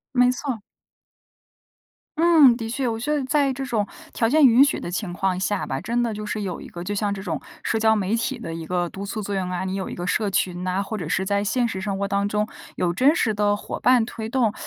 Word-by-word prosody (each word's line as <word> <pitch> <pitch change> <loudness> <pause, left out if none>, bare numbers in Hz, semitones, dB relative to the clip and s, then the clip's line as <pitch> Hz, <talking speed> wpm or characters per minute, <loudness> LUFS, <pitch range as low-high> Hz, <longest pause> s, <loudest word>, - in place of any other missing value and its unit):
没 250 0 +5
错。 255 -4 -4 1.6
嗯， 315 -7 +6
的 225 -2 -5
确 255 +1 -1
我 225 -1 -1
觉 295 +7 -1
得 295 - +1
在 280 0 +2
这 270 +1 -4
种 220 -5 0 0.3
条 225 - +1
件 300 +2 +6
允 250 +2 +7
许 285 - +1
的 - - -5
情 180 +1 -3
况 185 0 0
下 195 +1 -1
吧， 135 - -3
真 235 +2 0
的 235 -2 0
就 210 0 -5
是 210 0 -3
有 190 - -4
一 - - -9
个 175 - -8
就 205 +3 -3
像 205 0 0
这 195 - -6
种 165 -7 -3 0.2
社 225 - 0
交 220 0 +4
媒 205 0 0
体 255 +2 -2
的 165 -8 -6
一 165 0 -6
个 175 +1 -1
督 195 +3 -7
促 215 +2 -4
作 200 0 -3
用 185 -1 -2
啊， 180 +1 -2
你 190 0 -2
有 190 -1 -3
一 - - -6
个 175 +1 -4
社 210 +2 +1
群 180 -2 -1
呐， 185 +1 0
或 215 +2 -4
者 165 -4 -5
是 190 - 0
在 200 +1 +1
现 240 +4 +1
实 190 -4 -4
生 195 -1 -2
活 200 - 0
当 200 0 0
中 210 +1 0 0.3
有 175 -1 +1
真 265 - +4
实 225 -9 +1
的 205 0 +2
伙 - - -6
伴 250 -3 +4
推 220 -1 -6
动， 235 -4 +1
210 Hz, 280 characters per minute, -23 LUFS, 190-240 Hz, 1.6 s, 允